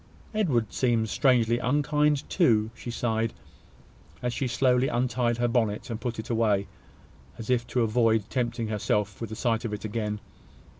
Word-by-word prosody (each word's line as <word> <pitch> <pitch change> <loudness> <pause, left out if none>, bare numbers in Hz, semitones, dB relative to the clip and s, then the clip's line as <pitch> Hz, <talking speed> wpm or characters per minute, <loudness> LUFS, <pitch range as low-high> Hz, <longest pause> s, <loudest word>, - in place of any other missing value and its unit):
Edward 135 - +1
seems 115 -4 +1
strangely 120 -4 +3
unkind 150 +2 +1
too," 110 - +2
she 120 - -8
sighed, 115 -1 -1 0.9
as 125 -1 -1
she 130 +2 -1
slowly 125 +1 +2
untied 120 -1 0
her 120 0 +1
bonnet 115 -2 0
and 115 - -4
put 120 -2 -3
it 110 - -5
away, 105 -4 +2 0.7
as 115 +2 -4
if 120 -1 +1
to 125 - 0
avoid 110 -2 +2
tempting 120 -3 -2
herself 105 -1 -1
with 115 - -4
the 110 - -6
sight 115 -1 0
of 115 -3 -3
it 105 +1 -5
again. 105 -1 -2
115 Hz, 160 wpm, -27 LUFS, 110-125 Hz, 0.9 s, strangely